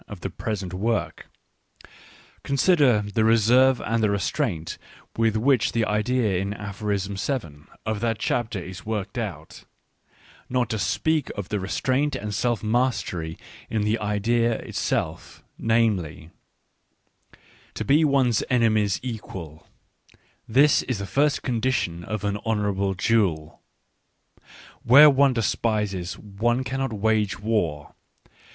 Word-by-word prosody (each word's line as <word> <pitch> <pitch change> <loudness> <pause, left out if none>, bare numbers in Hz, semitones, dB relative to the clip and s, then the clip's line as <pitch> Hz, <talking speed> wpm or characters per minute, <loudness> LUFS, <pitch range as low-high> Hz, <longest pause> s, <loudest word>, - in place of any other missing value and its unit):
of 100 -4 -10
the - - -4
present 100 -5 -4
work; 110 +4 -2 1.1
con 140 - -2
siderthe 125 - +3
reserve 120 +4 +4
and 115 +1 -1
the 105 - +2
restraint 100 - -2 0.4
with 115 -1 +1
which 125 +1 +2
the 115 -1 +1
idea 105 -2 0
in 100 +2 -3
Aphorism 100 -1 -3
7 85 - -4 0.2
of 110 -1 -2
that 115 0 -1
chapter 115 0 -1
is 95 +1 -8
worked 110 +2 -4
out, 105 -6 -7 0.4
— - - -28
not 125 -3 0
to 110 - -2
speak 155 +7 0
of 100 -1 -5
the 105 - -1
restraint 130 +9 0
and 105 +1 -4
self 120 +2 -1
mastery 105 -8 -1 0.3
in 110 -2 -1
the 105 +2 0
idea 115 +3 +1
itself, - - -3 0.2
namely: 100 -9 0 0.4
— - - -46
" - - -27
To - - -4
be 145 +4 +4
one's 135 -6 +2
enemy's 110 -5 +2
equal 95 - -7 0.4
— - - -32
this 145 +1 +6
is 130 -4 -3
the 100 - -4
first 145 +7 +1
condition 115 -9 -1
of 105 +2 -4
an 100 0 -1
honourable 100 -3 -1
duel. 95 -7 0 1.2
Where 145 +5 +8
one 140 0 +4
despises 105 -5 -1
one 115 +5 -1
cannot 135 0 -2
wage 110 -1 0
war. 100 -10 -2
110 Hz, 130 wpm, -24 LUFS, 100-120 Hz, 1.2 s, Where